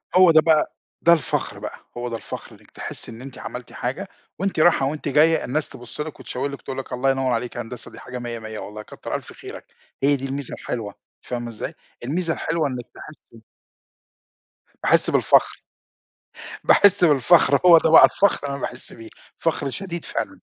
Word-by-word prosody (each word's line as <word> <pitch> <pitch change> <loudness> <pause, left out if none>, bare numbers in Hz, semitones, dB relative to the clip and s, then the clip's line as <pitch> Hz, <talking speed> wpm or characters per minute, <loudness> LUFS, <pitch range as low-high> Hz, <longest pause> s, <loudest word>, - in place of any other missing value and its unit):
هو 185 -2 +8
ده 155 0 +7
بقى 160 -2 +2 0.3
ده 170 - +7
الفخر 160 - -1
بقى. - - -7 0.2
هو 120 0 -3
ده 115 - -4
الفخر 110 - -8
إنِّك - - -22
تحسّي - - -7
إن 115 +2 -10
أنتِ 135 -1 -10
عملتِ 125 -1 -8
حاجة 140 +11 -4 0.3
وأنتِ 195 -4 -1
راحة 155 -5 +4
وأنتِ 150 +1 -3
جاية 155 +3 +4
الناس 140 +1 -1
تبُص 120 +4 -8
لِك 155 -1 -6
وتشاور 135 +3 -4
لِك 140 - -8
تقول 130 - -6
لِك 135 -1 -6
الله 135 +2 +2
ينوّر 135 -1 0
عليك 120 +1 -3
يا - - -3
هندسة 120 +1 -8
دي - - -12
حاجة 125 0 -7
مِيّة، 120 -1 -5
مِيّة 110 0 -7
والله 105 +1 -8
كتّر - - -7
ألف - - -7
خيرك. - - -10 0.4
هي 145 +1 +4
دي 135 0 -5
الميزة 135 0 -4
الحلوة 105 -4 -5 0.3
فاهمة 120 -1 -5
إزاي؟ 110 - -6 0.3
الميزة 165 +5 -1
الحلوة 160 -2 -1
إنِّك 125 -2 -5
تحسّي 115 -7 -13 1.4
تحسّي - - +3
بالفخر. - - +3 1.0
باحِس 200 -2 +5
بالفخر 145 -1 +5
هو 170 -2 +10
ده 160 - +3
بقى 160 - +10
الفخر 200 -2 +2
اللي 140 -1 -3
أنا 140 - -8
باحِس 120 - -4
بيه، 115 -1 -11 0.3
فخر 150 -4 -1
شديد 175 +2 -5
فعلًا. - - -4
135 Hz, 185 wpm, -23 LUFS, 120-160 Hz, 1.4 s, هو